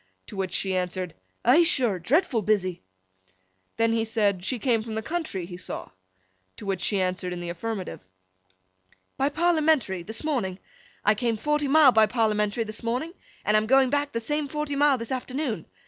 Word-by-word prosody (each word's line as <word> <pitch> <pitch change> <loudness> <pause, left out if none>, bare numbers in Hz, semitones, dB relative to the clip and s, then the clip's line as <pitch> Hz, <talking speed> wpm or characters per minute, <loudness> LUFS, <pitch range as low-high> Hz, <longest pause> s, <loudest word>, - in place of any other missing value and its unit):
To - - -10
which 190 -2 -2
she 190 -1 0
answered 180 -1 -2 0.3
'Eigh 260 +8 +7
sure! 245 - +2
Dreadful 255 - +2
busy!' 190 -4 0 1.0
Then 230 0 +2
he 225 -1 +1
said, 210 -5 +1
she 250 +6 0
came 230 -1 +1
from 220 0 -6
the 220 - -2
country, 310 - -3
he 175 0 -8
saw? 180 - -5 0.7
To - - -9
which 195 -2 -2
she 200 - +1
answered 185 0 -1
in 180 - -4
the 175 0 -5
affirmative. 200 +2 -5 1.2
'By 275 +1 +2
Parliamentary, 310 - +2
this 220 - -5
morning. 235 -12 -1 0.5
I 210 - +6
came 230 +1 -1
forty 295 +4 0
mile 295 -1 +7
by 220 -2 +5
Parliamentary 215 -1 +1
this 215 -1 -6
morning, 250 +9 -2 0.3
and 210 - +3
I'm 215 0 +3
going 265 +1 +4
back 290 0 0
the 230 - -2
same 295 +5 -2
forty 300 0 -3
mile 285 -1 +4
this 230 0 -6
afternoon. 260 -1 -3
225 Hz, 180 wpm, -26 LUFS, 195-280 Hz, 1.2 s, Eigh